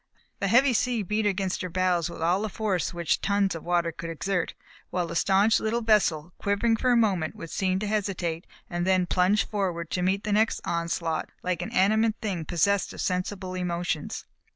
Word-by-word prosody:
The 195 - 0
heavy 250 +5 +5
sea 240 -1 +1
beat 210 +3 0
against 190 -2 -1
her 185 - -3
bows 180 -1 +1
with 170 - -6
all 175 +4 +2
the 220 - -2
force 200 -4 -1
which 170 -2 0
tons 200 -1 +1
of 165 - -7
water 175 -1 +1
could 165 +1 -7
exert, 175 +2 -2 0.3
while 180 -1 -1
the 170 0 -6
staunch 195 +5 +4
little 225 +2 -1
vessel, 180 -7 +2
quivering 205 +3 +1
for 250 +3 +1
a 240 - +5
moment 190 -8 +1
would 165 - -8
seem 185 -1 0
to 205 - -2
hesitate, 190 -5 -2 0.2
and 175 0 -2
then 185 -1 +3
plunge 185 +3 +2
forward 180 -5 -2
to 180 - -1
meet 190 +3 +1
the 210 - -2
next 220 +2 +2
onslaught 170 -1 -2
like 180 -2 -1
an - - -4
animate 215 +3 +3
thing 190 -8 -3
possessed 190 +5 +1
of - - -6
sensible 185 0 -2
emotions. 175 -4 -3
185 Hz, 195 wpm, -27 LUFS, 175-210 Hz, 0.3 s, heavy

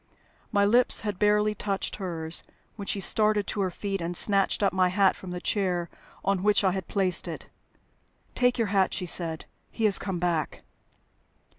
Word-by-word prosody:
My 200 -2 +3
lips 240 +4 +3
had 205 -3 -4
barely 210 0 +3
touched 200 -2 -3
hers, 165 -4 0 0.3
when 200 -2 -8
she 200 - -1
started 210 +1 +2
to 205 - -2
her 190 - +1
feet 195 +1 -4
and 170 +1 -2
snatched 200 0 +2
up 195 - +2
my 185 -1 +3
hat 195 +1 +3
from 185 - -10
the 180 0 -4
chair 180 -3 -1 0.3
on 195 -2 +1
which 210 +1 +3
I 190 - +3
had 190 -1 -4
placed 190 -3 -1
it. - - -7 0.8
"Take 245 0 +2
your 225 -4 0
hat," 190 -2 +2
she 185 - -3
said. 165 -2 -2 0.2
"He 225 - -2
has 205 -2 +3
come 190 -3 -3
back." 170 -3 -2
195 Hz, 180 wpm, -27 LUFS, 180-210 Hz, 0.8 s, My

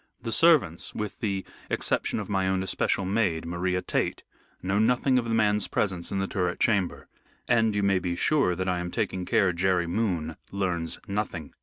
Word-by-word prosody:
The 115 - -5
servants 135 - +3
with 105 -1 -4
the 100 -6 -2 0.2
exception - - 0
of 105 - -5
my 95 -2 0
own 95 0 +1
especial 95 +1 0
maid, 95 -5 0
Maria 90 +2 -1
Tait - - -1 0.4
know 95 +2 +1
nothing 125 +3 +3
of 120 - -3
the 115 - +1
man's 105 -2 +2
presence 90 -4 -1
in 100 - -1
the 95 - 0
turret 90 -3 -2
chamber. 100 -6 +1 0.4
And 110 -3 +3
you 100 - +1
may 100 -1 +3
be 90 -1 -2
sure 135 - +2
that 95 +1 -3
I 90 -1 0
am 90 0 -3
taking 90 +1 -2
care 100 -5 +2
Jerry 90 0 +1
Moon 85 -4 -1
learns 90 -4 -1
nothing. 100 -6 -3
95 Hz, 185 wpm, -27 LUFS, 90-105 Hz, 0.4 s, servants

